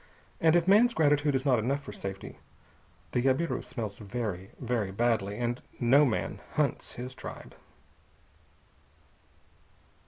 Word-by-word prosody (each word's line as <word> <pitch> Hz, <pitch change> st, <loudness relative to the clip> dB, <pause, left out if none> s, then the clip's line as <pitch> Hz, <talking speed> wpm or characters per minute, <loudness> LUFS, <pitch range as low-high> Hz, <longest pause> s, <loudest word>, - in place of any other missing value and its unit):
And 160 Hz, 0 st, +4 dB
if 175 Hz, 0 st, +3 dB
man's 230 Hz, +5 st, +5 dB
gratitude 145 Hz, -2 st, +3 dB
is 130 Hz, +1 st, -1 dB
not 130 Hz, -4 st, +4 dB
enough 135 Hz, +6 st, -1 dB
for 105 Hz, -, -8 dB
safety, 100 Hz, -1 st, -7 dB, 0.7 s
the 125 Hz, -, +1 dB
jabiru 135 Hz, +1 st, +1 dB
smells 115 Hz, -5 st, -6 dB
very, 100 Hz, -3 st, -4 dB
very 120 Hz, -5 st, -1 dB
badly, 105 Hz, -1 st, 0 dB
and 120 Hz, +1 st, -2 dB, 0.2 s
no 135 Hz, +5 st, +5 dB
man 120 Hz, -, -2 dB
hunts -, -, -1 dB
his 125 Hz, +1 st, -6 dB
tribe. -, -, -9 dB
125 Hz, 125 wpm, -29 LUFS, 110-145 Hz, 0.7 s, man's